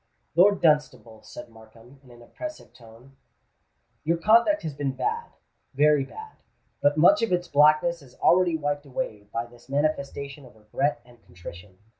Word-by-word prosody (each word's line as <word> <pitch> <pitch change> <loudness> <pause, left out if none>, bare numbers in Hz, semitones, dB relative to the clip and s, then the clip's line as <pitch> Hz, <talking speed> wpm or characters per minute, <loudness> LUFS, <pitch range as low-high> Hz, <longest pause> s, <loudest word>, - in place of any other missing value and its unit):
"Lord 195 +4 +4
Dunstable," 150 -8 +1
said - - -11
Markham, 115 +4 -18
in 130 - -19
an 120 -1 -16
impressive 310 - -9
tone, 120 +3 -18 0.9
"your 170 +2 +1
conduct 230 - +3
has 155 -2 -4
been 140 -1 -3
bad—very 150 - -1
bad; 440 - -12 0.4
but 145 +1 +2
much 180 +7 +5
of 230 - -1
its 175 -1 0
blackness 155 +3 +3
is 130 -3 -18
already 175 -2 +3
wiped 145 -1 -3
away 105 -5 -5
by 115 +1 -3
this 120 +1 -19
manifestation 140 -1 -2
of 125 -4 -16
regret 135 +7 -2
and 120 -1 -20
contrition. 90 +1 -12
145 Hz, 150 wpm, -25 LUFS, 120-170 Hz, 0.9 s, much